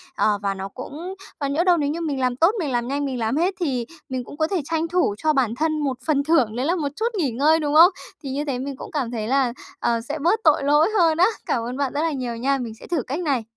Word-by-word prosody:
ờ, 210 -1 +2
và 200 -1 0
nó 190 0 -5
cũng 300 - -7 0.3
còn 280 -1 -1
nhỡ 325 +4 +2
đâu 355 -1 +4
nếu 290 -3 0
như 325 +3 -3
mình 295 -5 -2
làm 255 -1 +1
tốt, 330 +8 +4
mình 305 -6 -2
làm 240 -1 -1
nhanh, 285 +2 -1
mình 260 -3 -3
làm 225 +4 0
hết 355 +4 +2
thì 260 -9 -1 0.2
mình 260 -1 -3
cũng 285 - -11
có 315 0 +1
thể 370 -1 -1
tranh 325 +1 -1
thủ 345 - +1
cho 310 +6 +1
bản 250 -5 +1
thân 310 +3 0
một 275 -4 -1
phần 285 -3 +2
thưởng 280 -8 +2
đấy 250 +2 -1
là 340 +4 +2
một 300 -5 -1
chút 455 +4 -1
nghỉ 295 -9 +1
ngơi, 300 +7 +3
đúng 295 -2 -1
không? 340 +4 +9 0.3
Thì 275 - -5
như 285 +3 -2
thế 265 -4 -2
mình 275 +1 -4
cũng - - -9
cảm 265 -6 -2
thấy 220 -3 -3
là, 260 -1 +2 0.3
ờ, 235 -1 0
sẽ 290 +6 -5
bớt 350 +9 +2
tội 305 -3 +4
lỗi 295 +5 +4
hơn 330 -4 +4
á. 355 - +6 0.2
Cảm 235 - 0
ơn 245 +2 -4
bạn 280 -2 -1
rất 290 - 0
là 325 0 +1
nhiều 250 -4 -3
nha, 275 +4 +1
mình 240 -4 -5
sẽ - - -13
thử 340 -5 0
cách 280 +8 -4
này! 280 -9 0
285 Hz, 290 wpm, -23 LUFS, 250-320 Hz, 0.3 s, không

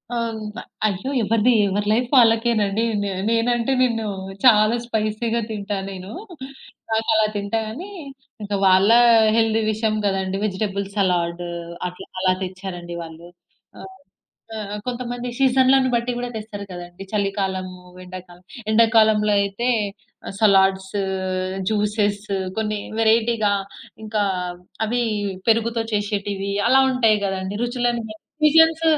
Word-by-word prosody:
అవును. 230 -1 -2 0.5
అయ్యో! 200 +6 -3
ఎవరిది 225 +3 +3 0.2
ఎవరి 205 +2 -1
లైఫ్ 240 +2 0
వాళ్ళకేనండి. 225 -3 +3 0.2
నె 200 - -2 0.2
నేనంటే 235 +2 +1
నిన్ను, 225 -3 +1 0.4
చాలా 215 -1 +6
స్పైసీ‌గా 225 +1 -1
తింటా 205 -1 -3
నేను. 190 +1 -8 0.8
నాకు 220 0 0
అలా 220 0 +4
తింటా 200 +2 -1
గానీ, 305 - -7 0.5
ఇంక 205 0 -5
వాళ్ళ 190 +2 +5 0.5
హెల్తీ 225 0 +2
విషయం 215 0 -1
కదండీ. 195 -1 -1
వెజిటబుల్ 200 0 -2
సలాడూ 175 -3 0 0.4
అట్లా, 180 - -12
అలా 185 -1 +3
తెచ్చారండి 180 -2 -7
వాళ్ళు. 165 +1 -11 0.5
ఆహ్, 190 0 -11 0.6
ఆహ్, 210 -1 -5
కొంతమంది 245 0 -4
సీజన్లను 265 0 +4
బట్టి 235 +1 0
కూడా 245 0 -3
తెస్తారు 210 -2 -7
కదండీ, 175 +1 -9
చలికాలము, 190 -2 -2 0.3
ఎండాకాలం. 180 -1 -11 0.3
ఎండాకాలంలైతే 215 -1 +3 0.6
ఆహ్, - - -7
సలాడ్స్, 190 -2 +3 0.8
జ్యూసెస్స్ 210 -1 -1 0.3
కొన్ని 215 -1 -2 0.2
వేరైటీ‌గా, 225 -1 +2 0.5
ఇంకా 215 -1 0 0.6
అవి 240 +3 0 0.5
పెరుగుతో 230 +1 +2
చేసేటివి 205 -1 -2 0.2
అలా 265 +1 +6
ఉంటాయి 225 -4 +3
కదండీ. 190 0 -3
రుచులను 240 -1 -1
బ - - -7 0.3
సీజన్స్ 320 +1 +5
215 Hz, 110 wpm, -22 LUFS, 195-230 Hz, 0.8 s, చాలా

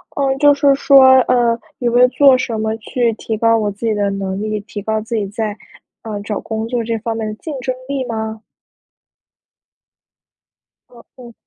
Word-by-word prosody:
呃， 270 -1 0
就 290 +1 +5
是 280 0 +3
说， 275 -1 +6 0.2
呃， 240 -2 +1 0.2
有 240 -2 0
没 240 - +3
有 250 - +7
做 270 0 +5
什 235 -3 -3
么 220 0 -1
去 235 +1 -1
提 220 0 -4
高 230 +1 +3
我 210 -2 -1
自 205 +4 -7
己 225 - +1
的 205 -1 0
能 195 -1 -4
力， 215 0 -2
提 205 0 -8
高 220 +1 -2
自 225 +2 -5
己 210 -2 -1
在， 210 +1 -4 0.5
呃， 215 -2 -5
找 205 0 -4
工 220 0 -4
作 240 -1 -2
这 225 0 -2
方 225 +1 -4
面 220 - -3
的 215 - -4
竞 310 +7 -7
争 255 +1 -2
力 275 -2 -3
吗？ 220 -1 -5 2.5
哦 235 -1 -17
哦。 240 -2 -13
225 Hz, 205 characters per minute, -17 LUFS, 215-250 Hz, 2.5 s, 有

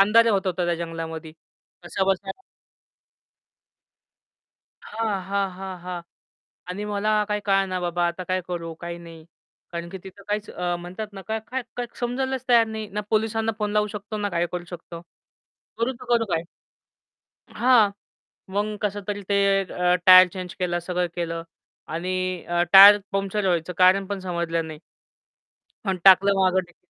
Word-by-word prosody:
अंधारे 230 +3 +6
होत 195 -2 0
होता 180 -1 -1
त्या 175 - +1
जंगलामध्ये 165 -1 -6 0.5
कसाबसा 190 +2 -1 2.6
हां, 215 -3 -2
हां, 200 -1 0
हां, 190 -1 -7
हां. 180 -1 -5 0.7
आणि 205 +3 -4
मला 210 +1 +1
काय 210 -1 -1
कळेना 195 -2 +1
बाबा 175 0 0
आता 170 +2 -4
काय 185 +1 -1
करू? 170 -2 -4
काय 170 0 -5
नाही? 165 -2 -12 0.5
कारण 170 0 -5
की 190 - -7
तिथं 195 +1 -12
काहीच 210 +1 -2 0.3
म्हणतात 185 +5 -6
ना 195 - -8
काय, 220 0 -1
काय, 260 +3 -3 0.2
काय 245 - -1
समजायलाच 260 +1 -2
तयार 235 -2 +6
नाही 220 -1 -5
ना 210 - -1
पोलिसांना 225 +1 +1
फोन 210 -1 -1
लावू 210 0 +2
शकतो, 210 +1 -6
ना 205 -1 -1
काय 170 -1 0
करू 175 -1 -4
शकतो. 170 -1 -9 0.8
करू 230 +3 0
तर 235 - -13
करू 230 -1 +1
काय? 165 - +1 1.1
हां. 240 -4 +5 0.6
मग 210 +1 -1
कसं 205 0 -1
तरी 205 -1 -3
ते 200 0 +2 0.3
अ, 180 0 +2
टायर 185 0 +10
चेंज 185 -1 -7
केलं 175 -1 0
सगळं 180 +1 -2
केलं 165 -1 -3 0.5
आणि 185 +2 -2
अ, 175 0 +1
टायर 200 +2 +11
पंक्चर 195 +1 -1
व्हायचं 175 -1 0
कारण 185 +2 +5
पण 200 0 -4
समजलं 170 -2 -2
नाही. 155 -1 -8 1.1
आणि 190 -2 0
टाकल 195 +1 +7
मग 190 -1 +3
डिक् 175 - -23
190 Hz, 155 wpm, -24 LUFS, 175-210 Hz, 2.6 s, टायर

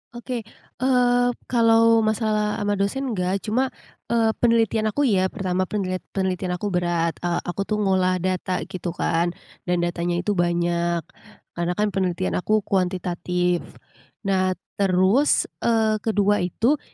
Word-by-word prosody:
Oke. 240 0 -4 0.4
Eee, 245 -1 +3 0.2
kalau 230 -1 +5
masalah 215 -1 0
sama 205 - +1
dosen 255 +7 -1
nggak 190 -1 -1
cuma, 250 +5 +1 0.4
eee, 225 -1 +2
penelitian 225 -2 +2
aku 285 +7 0
iya. 195 -7 +3
Pertama, 185 -2 -2
penlit 185 -3 -2 0.2
penelitian 185 -1 -1
aku 200 +3 -3
berat. 175 -2 0
Eee, 175 -1 -1
aku 195 +3 -3
tuh 215 - 0
ngolah 185 -1 +2
data 185 0 -1
gitu 175 -1 -5
kan, 170 +1 0 0.3
dan 175 -1 +1
datanya 175 0 -1
itu 210 - 0
banyak, 170 -2 0 0.5
karena 175 0 -2
kan 210 +2 +1
penelitian 175 - -1
aku 215 - +1
kuantitatif. 180 -1 0 0.6
Nah, 185 -2 +1 0.2
terus, 195 +8 +3 0.2
eee, 220 -2 +2
kedua 205 -1 +2
itu, 225 - +1
190 Hz, 135 wpm, -23 LUFS, 180-220 Hz, 0.6 s, kalau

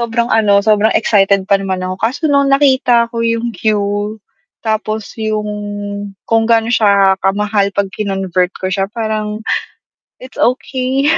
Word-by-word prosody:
sobrang 235 0 -1
ano, 205 -2 +4
sobrang 215 0 +3
excited 200 -2 +3
pa 195 0 +2
naman 190 -1 -3
ako, 185 0 -3
kaso 235 - -1
nung 280 -2 +3
nakita 275 -2 +3 0.2
ko 230 - -3
yung 230 0 -1
queue, 210 -1 -1 0.5
tapos 215 -1 -2
yung, 215 -1 -2 0.8
kung 225 0 +3
gaano 230 0 +2
siya 200 -3 +4
kamahal 205 +1 +1
'pag 200 -1 -1
kinonvert 190 -3 -1
ko 185 - -4
siya 195 0 0
parang, 215 -2 -2 0.9
it's 255 - -12
okey. 260 +3 0
215 Hz, 140 wpm, -15 LUFS, 200-230 Hz, 0.9 s, ano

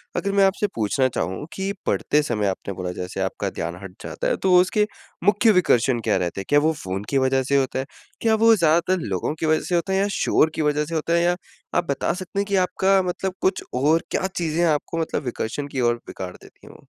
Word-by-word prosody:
अगर 200 - -1
मैं 200 -1 +4
आपसे 200 +2 +1
पूछना 115 +4 +1
चाहूँ 95 - -3
कि 195 +1 -2
पढ़ते 150 +1 +2
समय 110 -7 -1
आपने 95 +1 -3
बोला 90 -1 -4
जैसे 90 +1 -5
आपका 95 - -2
ध्यान 85 +1 -4
हट 95 -2 -9
जाता - - -3
है - - +1
तो 185 -1 +2
उसके 210 +3 +1 0.4
मुख्य 205 +3 +4
विकर्षण 130 - +3
क्या 100 - +1
रहते 90 +1 -2
हैं? - - -9
क्या 145 0 +5
वो 160 +2 +2
फ़ोन 95 +2 -3
की 140 - +1
वज़ह 130 0 +2
से 140 +2 0
होता 130 -1 0
है? 130 - -2 0.4
क्या 225 -1 +3
वो 225 +1 +5
ज़्यादातर 170 +1 +2
लोगों 95 - -2
की 160 - -1
वज़ह 155 0 +2
से 180 - +1
होता 185 +3 0
है 190 - +2
या 200 - +2
शोर 160 - +3
की - - -1
वज़ह 150 0 +1
से 165 +1 -5
होता 160 +2 0
है 170 - +3
या 175 0 +2 0.4
आप - - +3
बता 140 - 0
सकते 185 +2 -5
हैं 200 - +1
कि 200 - 0
आपका 190 +1 +3
मतलब 185 +1 -2
कुछ 190 0 +1
और 150 +6 +3
क्या 190 - 0
चीज़ें 165 0 0
आपको 155 +1 0
मतलब 160 -2 -2
विकर्षण 125 +3 -3
की 140 -2 -5
और 120 - +1
बिगाड़ 90 -1 -7
देती - - -18
हैं - - -12
वो। - - -18
155 Hz, 240 wpm, -23 LUFS, 125-185 Hz, 0.4 s, क्या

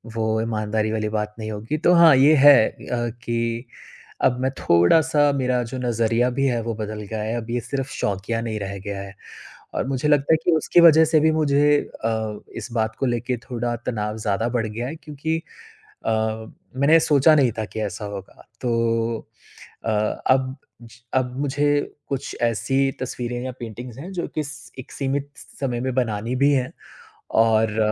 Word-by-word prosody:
वो 115 - -1 0.2
ईमानदारी 110 -1 -1
वाली 110 -1 -1
बात 105 0 -2
नहीं 110 0 -4
होगी। 110 +8 -3
तो 175 +3 +3
हाँ 165 -4 +8
ये 145 +4 +6
है 140 -4 +7
अ, 120 -1 -4
कि 115 +1 -2 0.6
अब 125 - +3
मैं 130 +1 +1
थोड़ा-सा 145 - +4
मेरा 125 -2 +1
जो 130 - -4
नजरिया 115 0 +1
भी 135 - +1
है 120 -3 0
वो 115 0 -2
बदल 110 0 -5
गया 110 -1 -3
है 110 +2 -2
अब 115 -1 -6
ये 120 - 0
सिर्फ़ 135 +2 -4
शौकिया 105 +4 -2
नहीं 110 -2 -3
रह 100 0 -5
गया 100 -1 -4
है। 100 0 -9 0.6
और - - -1
मुझे 135 +1 -1
लगता 145 +1 +3
है - - +5
कि - - +4
उसकी 170 +3 +3
वज़ह 160 -1 +8
से 160 0 +3
भी 160 +1 +4
मुझे 145 -1 +3 0.3
अ, 110 -2 -2 0.2
इस - - -7
बात 110 -1 -1
को - - +1
लेके 120 0 -1
थोड़ा 120 -1 -2
तनाव 105 -2 -2
ज़्यादा 110 +1 -1
बढ़ 120 -2 -1
गया 115 +3 -4
है 150 - -5
क्योंकि 160 0 -3 0.7
अ, - - +2 0.7
मैंने 150 +4 +6
सोचा 155 -1 +5
नहीं 130 -5 +3
था 110 - -1
कि 110 - -6
ऐसा 105 0 -4
होगा। 100 -2 -9 0.2
तो 115 -1 0 0.7
अ, 115 - 0
अब 130 +5 +1 0.6
अब 125 -1 0
मुझे 145 +1 +1 0.3
कुछ 135 -2 -4
ऐसी 135 +4 +1
तस्वीरें 120 -1 -4
या 130 - -4
पेंटिंग्स 120 +1 -8
हैं 175 +7 -8
जो 180 -2 -3
कि 155 - 0
स 145 +1 -10
एक 130 - -9
सीमित 140 +1 -2 0.3
समय 125 -4 -1
में 130 0 -2
बनानी 115 -1 -1
भी 140 +2 +4
है 130 -2 0 0.7
और 110 -1 +2
120 Hz, 180 wpm, -23 LUFS, 110-140 Hz, 0.7 s, हाँ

